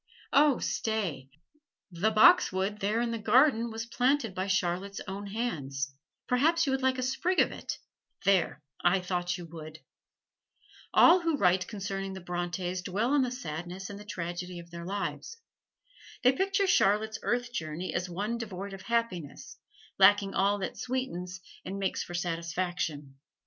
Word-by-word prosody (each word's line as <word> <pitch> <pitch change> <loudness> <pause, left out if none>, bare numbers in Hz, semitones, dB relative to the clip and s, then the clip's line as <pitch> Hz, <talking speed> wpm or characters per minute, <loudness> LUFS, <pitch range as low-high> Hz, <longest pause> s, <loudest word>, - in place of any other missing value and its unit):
Oh, 285 -2 +5
stay! 185 -12 -2 0.6
the 180 +5 +1
boxwood 210 - +5
there 215 +3 +1
in 240 -1 -1
the 230 - -3
garden 235 +2 +4
was 225 0 -5
planted 250 -1 +1
by 185 +1 -2
Charlotte's 190 +1 -1
own 200 +1 -5
hands 140 - -3 0.3
perhaps 320 +7 +3
you 275 - 0
would 265 0 0
like 260 0 +2
a 255 - -2
sprig 345 +8 0
of - - +4
it - - -5 0.5
there, 185 -6 +2 0.2
I 175 +2 +4
thought 180 -1 -2
you 175 - -8
would! 155 -1 -9 1.1
All 350 +2 +7
who 330 -3 +1
write 185 -4 +3
concerning 195 -2 -4
the 190 - -6
Brontes 175 +1 -3
dwell 205 +8 0
on 290 - +4
the 255 - +1
sadness 180 - -6
and 200 - -8
the - - -9
tragedy 180 -2 -5
of 170 0 -11
their 170 0 -7
lives. 205 - -4 0.9
They 250 - +7
picture 390 +6 +1
Charlotte's 220 - +2
earth 245 0 -1
journey 160 -1 -4
as 180 +1 -2
one 210 +7 -2
devoid 200 -3 -6
of 195 - -8
happiness, 230 - -3 0.4
lacking 200 -1 +6
all 200 +1 +2
that - - -4
sweetens 190 -8 -3 0.2
and 195 +2 -5
makes 195 -1 -1
for 175 - -6
satisfaction. 165 -4 -3
195 Hz, 155 wpm, -29 LUFS, 175-235 Hz, 1.1 s, All